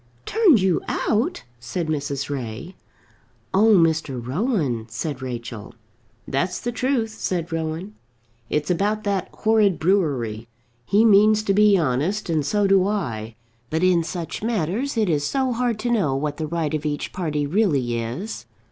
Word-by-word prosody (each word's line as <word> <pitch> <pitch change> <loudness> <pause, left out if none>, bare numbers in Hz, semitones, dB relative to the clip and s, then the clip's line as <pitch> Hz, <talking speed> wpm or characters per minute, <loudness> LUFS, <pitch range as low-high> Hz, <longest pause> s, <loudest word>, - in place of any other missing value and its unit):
"Turned 400 - +4
you 185 -3 +2
out?" 235 - 0 0.2
said 120 +9 -3
Mrs. 140 -2 -2
Ray. 135 +4 -5 0.8
"Oh, 215 +3 +5
Mr. 160 -6 +2
Rowan!" 135 - -1
said 130 +5 -4
Rachel. 120 -3 -6 0.5
"That's 175 +7 -1
the 240 - -3
truth," 245 -2 0
said 180 -5 -3
Rowan. 165 +5 -3 0.6
"It's 150 +4 0
about 210 +4 0
that 200 -3 -1
horrid 215 -5 +2
brewery. 140 - 0 0.4
He 210 +4 +4
means 215 0 +5
to 200 - +1
be 210 0 +5
honest, 165 +7 0
and 155 -2 +1
so 205 +7 +1
do 195 -1 +4
I. 115 - -3 0.3
But 160 +3 -1
in 180 -2 +4
such 170 0 -5
matters 225 - -1
it 215 -2 +2
is 150 -4 +1
so 265 -2 0
hard 235 -2 0
to 240 +1 -1
know 165 - +1
what 145 +1 -2
the 155 - -3
right 160 -2 -2
of 155 -1 -1
each 145 -1 -3
party 150 -5 -1
really 140 - +1
is. 130 - -5
170 Hz, 155 wpm, -23 LUFS, 145-210 Hz, 0.8 s, Oh